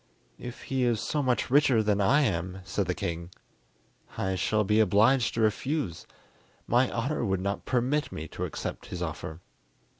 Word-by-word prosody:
"If 120 -1 -8
he 135 -1 -1
is 120 -3 +2
so 150 +5 -1
much 125 -2 0
richer 135 -5 +5
than 105 -1 +1
I 140 +10 +4
am," 95 - -1
said 95 0 -2
the 90 - -1
king, 85 0 -4 0.9
"I 95 0 0
shall 105 +3 +1
be 105 +2 +2
obliged 110 +5 +4
to 115 - 0
refuse. 110 - -1 0.6
My 125 +2 +3
honour 125 +4 -1
would 95 -4 0
not 100 +2 -3
permit 130 +4 0
me 80 +1 -6
to - - -4
accept - - -5
his - - -4
offer." 80 +2 -6
110 Hz, 170 wpm, -28 LUFS, 95-130 Hz, 0.9 s, richer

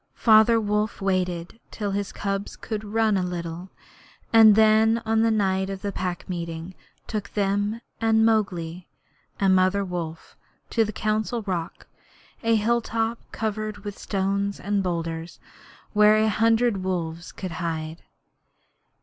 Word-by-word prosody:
Father 225 0 +5
Wolf 210 0 -1
waited 185 0 -2
till 205 -2 -3
his 200 0 -2
cubs 195 0 -3
could 215 -2 -5
run 215 0 +1
a - - +1
little, 175 0 -5 0.6
and 220 -2 +8
then 220 +1 +5
on 220 0 +2
the 230 - +3
night 190 -3 +1
of 195 0 -6
the 200 - -2
Pack 180 -2 -4
Meeting 170 0 -5 0.3
took 210 -3 -4
them 205 +2 -1 0.2
and 220 0 +3
Mowgli 180 -6 0 0.5
and 195 -1 +4
Mother 185 +2 +2
Wolf 170 -3 -6 0.4
to 225 - +3
the 215 - -3
Council 215 +2 -1
Rock 180 -4 -4 0.6
a 230 -1 +2
hilltop 225 +1 0
covered 215 -2 -3
with 205 -1 -5
stones 200 0 -1
and 200 0 0
boulders 165 -2 -4 0.5
where 210 0 +6
a 220 0 +3
hundred 225 +1 +2
wolves 175 -3 -3
could 185 -2 -6
hide. 160 -1 -4
200 Hz, 135 wpm, -25 LUFS, 180-220 Hz, 0.6 s, and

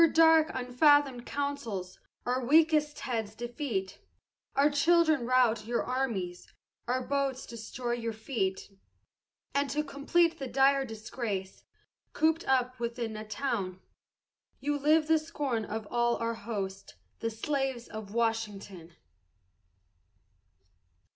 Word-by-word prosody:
Your 335 - +7
dark 320 -1 +6
unfathomed 260 0 +3
councils 240 -11 -3 0.3
our 250 +1 0
weakest 305 +2 +3
heads 225 -4 -3
defeat, 235 -5 -4 0.6
Our 285 +2 +4
children 315 -3 +3
rout 235 -4 +3
your 235 0 0
armies, 225 -9 -3 0.4
our 250 +1 0
boats 275 -2 -1
destroy 240 +2 -5
your 230 -1 -2
fleet, 205 -4 -3 0.7
And 280 0 +1
to 300 +2 0
complete 330 +4 +1
the 270 - -4
dire 270 +1 +3
disgrace, 215 -4 -5 0.5
cooped 320 +1 +2
up 255 -1 +1
within 235 -1 -3
a 215 0 -7
town, 210 -6 -2 0.8
You 290 +1 -1
live 305 +2 +4
the 320 0 +4
scorn 285 -8 -2
of 215 0 -5
all 240 0 +2
our 230 0 -1
host, 195 -3 -5 0.2
the 230 - -1
slaves 265 +1 -2
of 215 -2 -8
Washington! 205 -7 -2
245 Hz, 115 wpm, -30 LUFS, 220-285 Hz, 0.8 s, Your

